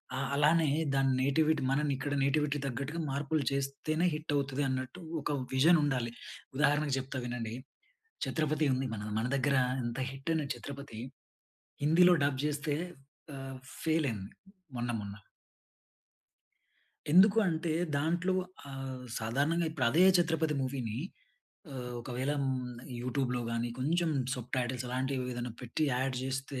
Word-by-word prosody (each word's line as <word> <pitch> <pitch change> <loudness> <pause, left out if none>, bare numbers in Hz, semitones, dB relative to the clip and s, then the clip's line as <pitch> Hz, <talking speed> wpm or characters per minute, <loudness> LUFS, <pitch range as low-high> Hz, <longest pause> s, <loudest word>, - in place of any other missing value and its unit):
ఆ! - - -2 0.2
అలానే 155 +2 +4 0.3
దాని 135 0 +3
నేటివిటీ 155 +3 +3
మనం 150 +2 +2
ఇక్కడ 140 +2 -3
నేటివిటీ 150 +1 +2
తగ్గట్టుగా 140 +5 -3
మార్పులు 145 +2 0
చేస్తేనే 140 +5 0
హిట్ 155 -1 -3
అవుతది 140 0 0
అన్నట్టు 130 +6 -3 0.2
ఒక 145 - -1 0.2
విజన్ 160 +6 +6
ఉండాలి. 125 -5 0 0.5
ఉదాహరణకు 145 0 +3
చెప్తా 130 0 -4
వినండి. 120 -2 -3 0.7
'ఛత్రపతి' 155 -2 +1
ఉంది. 130 +1 -1
మన, 105 0 -5
మన 115 - 0
దగ్గర 140 +1 +2 0.3
ఇంత 120 +2 -3
హిట్ 135 +4 -5
అయిన 155 -3 0
'ఛత్రపతి' 135 -1 -8 0.8
హిందీలో 175 +4 +6
డబ్ 135 -2 0
చేస్తే 150 0 0 0.6
ఆహ్, 135 -1 -7 0.2
ఫెయిల్ 160 -2 +2
అయింది 100 -3 -6 0.5
మొన్న 120 0 -1
మొన్న. 100 -1 -6 2.0
ఎందుకు 195 +4 +7
అంటే, 165 0 -1 0.2
దాంట్లో 170 +5 +1 0.3
ఆహ్, 135 -1 -5 0.2
సాధారణంగా 145 +9 +1
ఇప్పుడు 155 -6 0
అదే 160 +8 +5 0.2
'ఛత్రపతి' 160 -3 +1
మూవీని 130 -4 -2 0.8
ఆహ్, 125 -2 -5
ఒకవేళ 130 +3 -2 0.7
యూట్యూబ్‌లో 125 0 -1
గాని, 115 +1 -1
కొంచెం 165 +5 +1 0.3
సబ్‌టైటిల్స్ 125 0 -2
లాంటివి 130 0 -1
ఏదైనా 120 -1 -4
పెట్టి, 150 +6 0 0.2
అడ్ 130 -1 -1
చేస్తే, 135 0 -3
140 Hz, 125 wpm, -32 LUFS, 130-155 Hz, 2.0 s, ఎందుకు